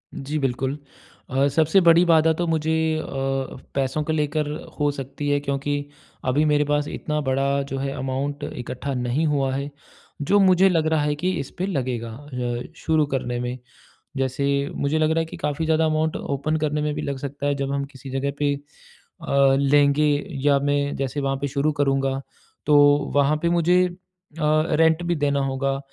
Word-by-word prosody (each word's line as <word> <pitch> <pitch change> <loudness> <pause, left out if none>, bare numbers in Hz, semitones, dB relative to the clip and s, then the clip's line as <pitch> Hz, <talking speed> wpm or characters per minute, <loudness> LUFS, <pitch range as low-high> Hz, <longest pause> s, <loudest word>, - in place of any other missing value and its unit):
जी, 145 +3 -4
बिल्कुल। 135 +1 -1 0.5
अ, 135 +2 +2
सबसे 160 +4 +4
बड़ी 170 0 +6
बाधा 160 -1 +5
तो 175 +2 -2
मुझे 160 -1 0 0.3
अ, - - -7 0.7
पैसों 135 +2 0
को 160 - -2
लेकर 150 0 0 0.3
हो 145 0 +2
सकती 140 +1 -5
है 145 0 +2
क्योंकि 145 +1 -2 0.4
अभी 140 +4 +2
मेरे 150 -1 +3
पास 145 0 0
इतना 150 0 -3
बड़ा 140 0 +1
जो 135 - -2
है, 135 0 -2
अमाउन्ट 140 +2 -3
इकट्ठा 130 +3 -5
नहीं 125 +5 0
हुआ 140 -3 +1
है, 140 +1 -3 0.5
जो 200 +8 +3
मुझे 190 0 +5
लग 165 -3 +1
रहा 155 - +2
है 145 0 0
कि 180 +5 -1
इस 135 - -5
पे 180 - -1
लगेगा 130 - -2
अ, 125 -2 -4
शुरू 160 -2 +1
करने 125 -2 -2
में। 125 +1 -3 0.6
जैसे 135 +1 -1 0.3
मुझे 145 +2 0
लग 155 0 +2
रहा 160 - +2
है 165 - 0
कि 160 - -9
काफ़ी 150 +2 -2
ज़्यादा 160 0 +2
अमाउन्ट 155 0 0
ओपन 140 +3 -2
करने 150 0 0
में 150 0 -1
भी - - -3
लग 140 -1 -3
सकता 140 +1 -5
है, 145 - +1
जब 140 0 -2
हम 140 0 -1
किसी 135 +1 -10
जगह 135 +1 -1
पे 145 -1 +2
अ, 140 -1 -1
लेंगे 140 +1 +4 0.4
या 140 -1 +5
मैं 145 0 0
जैसे 135 +1 -3
वहाँ 135 0 -1
पे 140 - 0
शुरू 140 +2 0
करूँगा, 135 -1 +1 0.4
तो 150 - +4 0.4
वहाँ 145 +2 +3
पे 170 - +1
मुझे 175 +1 +3
अ, - - -8 0.5
रेंट 155 +2 +3
भी 175 0 0
देना 145 -2 +1
होगा 135 0 -1
145 Hz, 185 wpm, -23 LUFS, 135-155 Hz, 0.7 s, बड़ी